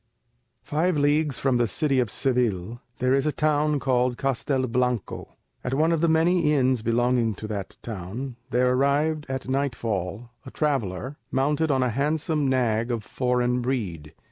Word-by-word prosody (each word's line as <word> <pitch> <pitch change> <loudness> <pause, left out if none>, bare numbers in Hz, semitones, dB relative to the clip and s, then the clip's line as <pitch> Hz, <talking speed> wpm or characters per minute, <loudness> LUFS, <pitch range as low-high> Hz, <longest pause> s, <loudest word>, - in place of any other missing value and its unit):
Five 160 +3 0
leagues 145 -1 +2
from 135 -2 +1
the 120 -1 +2
city 140 - +1
of 120 -4 +1
Seville 120 -4 -1 0.2
there 130 +1 +2
is 135 +2 +2
a - - +2
town 150 0 +1
called 125 -2 +1
Castelblanco. 125 -4 -1 0.3
At 125 +1 -1
one 160 +4 +3
of 165 -2 +1
the 170 - +3
many 160 0 +3
inns 130 -3 +2
belonging 115 -1 +1
to 110 - -8
that 100 -3 -5
town 115 +5 -6
there 125 0 +2
arrived 145 +3 +1
at 130 -1 -4
nightfall 115 -6 -2
a - - -9
traveller, 135 - -2
mounted 150 +4 +1
on 135 -2 +2
a 125 - +1
handsome 150 +3 0
nag 120 -3 +1
of 115 -3 -2
foreign 125 +1 0
breed. 95 - -3
130 Hz, 155 wpm, -25 LUFS, 120-145 Hz, 0.3 s, one